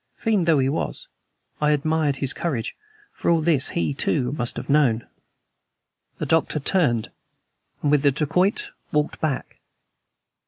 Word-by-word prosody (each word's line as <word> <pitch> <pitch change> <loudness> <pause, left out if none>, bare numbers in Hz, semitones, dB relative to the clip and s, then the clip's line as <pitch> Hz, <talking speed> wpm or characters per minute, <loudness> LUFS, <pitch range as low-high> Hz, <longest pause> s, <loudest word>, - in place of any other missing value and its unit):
Fiend 210 -7 +1
though 160 -3 +5
he 130 -1 +2
was, 145 +4 -3 0.5
I 150 - +3
admired 150 0 +1
his 135 0 0
courage; 135 -10 -3 0.4
for - - -2
all 170 -1 +4
this 155 -4 +2
he, 155 - 0
too, 130 -2 0
must 120 -5 -2
have - - -5
known. 135 -6 +3 1.1
The - - -3
Doctor 160 -1 +1
turned, 135 - +1 0.7
and 145 - +2
with 150 -2 +4
the 145 - +5
dacoit 180 - 0 0.2
walked 150 0 -1
back. 150 -5 -2
150 Hz, 145 wpm, -23 LUFS, 135-165 Hz, 1.1 s, though